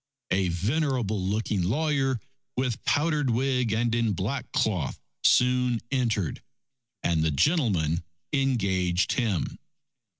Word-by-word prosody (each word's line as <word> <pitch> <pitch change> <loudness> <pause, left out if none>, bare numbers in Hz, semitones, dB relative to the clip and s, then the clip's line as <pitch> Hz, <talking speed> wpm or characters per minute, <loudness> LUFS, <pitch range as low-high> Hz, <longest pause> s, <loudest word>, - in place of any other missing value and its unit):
A 95 0 +2
venerable 110 - 0
looking 105 0 0
lawyer, 135 - +1 0.4
with 125 -3 -1
powdered 150 -2 +2
wig 125 -1 +1
and 115 +2 +1
in 115 -2 +1
black 115 +9 -3
cloth, 90 -11 0 0.2
soon 125 -1 +4
entered, 115 - 0 0.6
and 85 -2 +2
the 80 - +2
gentleman 85 - +2 0.3
engaged 95 -10 +1
him. 110 - -1
115 Hz, 105 wpm, -27 LUFS, 95-130 Hz, 0.6 s, soon